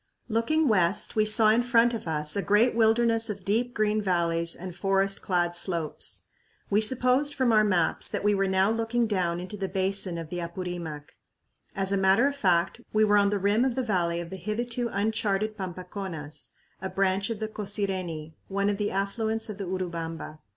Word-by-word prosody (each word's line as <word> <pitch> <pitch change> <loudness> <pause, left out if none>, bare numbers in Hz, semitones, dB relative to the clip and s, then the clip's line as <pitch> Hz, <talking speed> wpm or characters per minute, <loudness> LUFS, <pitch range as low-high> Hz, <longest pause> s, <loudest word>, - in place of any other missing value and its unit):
Looking 255 +8 +1
west, 190 -4 +1
we 215 -1 +3
saw 215 0 +5
in 225 +2 +4
front 240 -1 +3
of 225 -6 -5
us 150 -1 -1
a 200 - 0
great 210 +5 +3
wilderness 225 0 +3
of 200 -3 -6
deep 240 +5 0
green 215 0 +1
valleys 170 -3 0
and 180 -1 -8
forest 195 +1 +1
clad 175 -2 0
slopes. 170 -3 -1 0.5
We 205 +2 +4
supposed 255 +5 +2
from 255 -3 +2
our 215 -1 +5
maps 185 -5 +1
that - - -4
we 210 0 +3
were 195 -1 +1
now 190 +2 +2
looking 230 +1 0
down 180 -5 -1
into 185 +4 -6
the 195 -1 -2
basin 190 -1 0
of 165 -1 -7
the 175 - -3
Apurimac. 170 -3 -6 0.6
As 195 0 -1
a 200 - +2
matter 195 +6 +4
of 285 - -2
fact, 185 -2 +1
we 215 0 +3
were 205 0 +4
on 200 0 +4
the 205 - 0
rim 205 +4 +2
of 260 -3 0
the 260 - 0
valley 175 -6 0
of 170 -1 -7
the 190 - -5
hitherto 235 +5 -2
uncharted 215 0 0
Pampaconas, 180 -5 -6 0.3
a 190 - -3
branch 195 +1 0
of 225 -2 -4
the 220 - -2
Cosireni, 190 -7 -2
one 200 +1 0
of 205 - -1
the 205 0 -1
affluents 220 +3 -2
of 205 - -10
the 195 - -3
Urubamba. 165 -4 -5
200 Hz, 195 wpm, -27 LUFS, 180-220 Hz, 0.6 s, saw